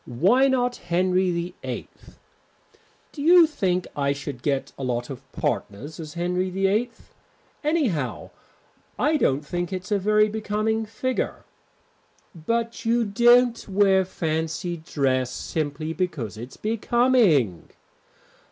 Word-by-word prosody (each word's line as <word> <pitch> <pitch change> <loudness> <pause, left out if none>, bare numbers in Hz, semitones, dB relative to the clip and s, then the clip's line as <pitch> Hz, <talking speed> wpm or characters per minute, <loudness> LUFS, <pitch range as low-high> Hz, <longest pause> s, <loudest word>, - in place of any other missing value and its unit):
Why 195 - +3
not 250 -2 +1
Henry 185 +1 +1
VIII?" 175 +1 -4 1.2
"Do 290 - -8
you 340 +3 +7
think 185 - -1
I 140 -1 +1
should 140 -3 -7
get 140 -1 -1
a 135 - -7
lot 120 0 -2
of 135 0 -10
partners 120 +9 -3
as 155 0 -8
Henry 180 +2 -1
VIII? 195 +6 +1 0.7
Anyhow, 205 - -1 0.7
I 305 +2 +2
don't 145 - +1
think 175 +3 -3
it's 185 +2 -5
a 205 - +2
very 210 +2 +3
becoming 215 +1 -1
figure." 255 +4 -3 0.9
"But 230 +8 -2
you 230 0 +2
don't 240 +3 +4
wear 195 -1 +4
fancy 165 0 -3
dress 135 -6 0
simply 155 +3 -3
because 155 - -3
it's 120 +4 -9
becoming." 215 - +2
180 Hz, 115 wpm, -24 LUFS, 145-225 Hz, 1.2 s, you